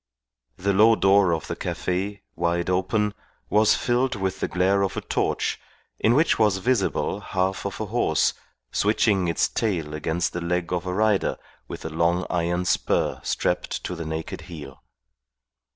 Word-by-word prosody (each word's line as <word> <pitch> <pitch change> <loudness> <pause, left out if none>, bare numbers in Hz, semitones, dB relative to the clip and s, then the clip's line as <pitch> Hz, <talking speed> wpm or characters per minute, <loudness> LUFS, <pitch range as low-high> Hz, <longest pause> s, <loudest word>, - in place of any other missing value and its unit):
The 100 +2 0
low 110 +3 +6
door 95 -2 +4
of 80 -3 -1
the - - -4
cafe, 95 +2 -3
wide 85 +1 0
open, 105 +3 +1 0.4
was 105 0 +5
filled 125 +1 +1
with 95 -2 -2
the - - -1
glare 95 +2 +2
of 95 -2 -1
a - - -1
torch - - -1 0.4
in 115 +2 +3
which 155 -2 +3
was 105 -3 +3
visible 100 -2 0
half 95 -1 -1
of 100 - -7
a 110 - -2
horse, 105 -8 +1 0.4
switching 100 -3 +2
its 85 - +2
tail 85 -9 -2
against 80 +3 -1
the 85 - -3
leg 90 +1 -1
of 90 +1 -2
a 90 - -1
rider 105 -1 +2 0.3
with - - -8
a - - -2
long 85 +3 +1
iron 85 +1 0
spur - - +1
strapped - - -1
to 90 - -4
the 85 - -5
naked 80 0 -5
heel. 75 -6 -9
95 Hz, 165 wpm, -24 LUFS, 85-105 Hz, 0.4 s, low